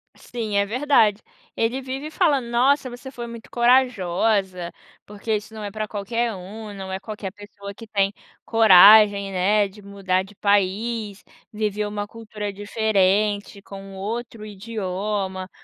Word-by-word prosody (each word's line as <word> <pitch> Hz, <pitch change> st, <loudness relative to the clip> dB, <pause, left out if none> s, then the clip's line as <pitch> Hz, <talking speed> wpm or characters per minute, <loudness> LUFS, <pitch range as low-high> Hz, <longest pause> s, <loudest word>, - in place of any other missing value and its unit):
Sim, 225 Hz, -4 st, -5 dB
é 200 Hz, -, +3 dB
verdade. 225 Hz, -3 st, +2 dB, 0.3 s
Ele 235 Hz, +4 st, 0 dB
vive 265 Hz, +3 st, -5 dB
falando: 305 Hz, -7 st, +1 dB
"Nossa, 255 Hz, +3 st, +2 dB
você 245 Hz, +2 st, -9 dB
foi 240 Hz, -2 st, -7 dB
muito 235 Hz, -1 st, -10 dB
corajosa, 205 Hz, -7 st, +1 dB, 0.3 s
porque 210 Hz, +2 st, -3 dB
isso 210 Hz, +1 st, -6 dB
não 215 Hz, -1 st, -7 dB
é 205 Hz, -, -5 dB
pra 215 Hz, +1 st, -4 dB
qualquer 225 Hz, +3 st, -2 dB
um, 205 Hz, +3 st, -9 dB
não 190 Hz, -1 st, -7 dB
é 190 Hz, -, -3 dB
qualquer 205 Hz, -2 st, -7 dB
pessoa 200 Hz, 0 st, -11 dB
que 225 Hz, +3 st, -12 dB
tem 200 Hz, -2 st, +1 dB, 0.3 s
coragem, 205 Hz, -1 st, +7 dB
né, 200 Hz, +3 st, +2 dB
de 200 Hz, +2 st, -15 dB
mudar 195 Hz, -2 st, -1 dB
de 200 Hz, +2 st, -16 dB
país, 205 Hz, +2 st, 0 dB, 0.3 s
viver 210 Hz, -1 st, -2 dB
uma 205 Hz, 0 st, -4 dB
cultura 215 Hz, -2 st, -6 dB
diferente, 205 Hz, 0 st, 0 dB
com 195 Hz, -1 st, -10 dB
outro 220 Hz, +2 st, -5 dB
idioma, 195 Hz, -2 st, -4 dB
210 Hz, 140 wpm, -23 LUFS, 195-225 Hz, 0.3 s, coragem